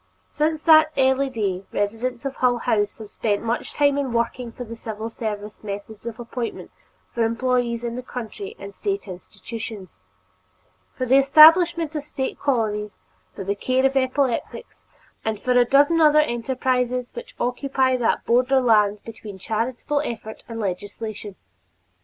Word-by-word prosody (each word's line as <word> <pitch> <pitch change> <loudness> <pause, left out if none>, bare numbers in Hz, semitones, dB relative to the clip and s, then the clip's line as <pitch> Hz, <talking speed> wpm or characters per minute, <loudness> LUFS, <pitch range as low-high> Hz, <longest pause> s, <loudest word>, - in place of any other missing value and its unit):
Since 310 +1 -1
that 315 -1 +6
early 265 +1 +3
day, 200 -6 -2
residents 235 +5 -2
of 275 - -4
Hull 250 -1 +2
House 215 -3 0
have 215 -2 -10
spent 205 -1 -1
much 230 +1 -2
time 285 -1 +3
in 265 -4 -2
working 235 +1 -1
for 245 - -7
the 230 -1 -8
civil 225 0 -6
service 210 -2 -6
methods 205 +2 -7
of 230 0 -6
appointment 240 0 -5 0.4
for 235 - +1
employees 235 0 0
in 235 0 -3
the 250 - -4
county 255 - -7
and 400 - -9
State 400 - -3
institutions; 195 - -8 1.0
for 255 - -2
the 265 +2 +5
establishment 325 +3 +6
of 300 -2 -3
State 270 -2 -4
colonies 215 -6 -1 0.4
for - - -5
the 200 +2 -1
care 255 +6 0
of 270 0 +2
epileptics; 265 - -1 0.4
and 220 -2 -2
for 250 - -1
a 245 -1 +5
dozen 290 +6 +4
other 305 -1 +6
enterprises 250 -1 -1
which - - -9
occupy 260 +1 +1
that 240 -2 0
borderland 235 -5 +3
between 215 -3 -9
charitable 235 +8 -2
effort 220 -4 -6
and 230 0 -6
legislation. 205 +1 -5
240 Hz, 150 wpm, -23 LUFS, 220-270 Hz, 1.0 s, that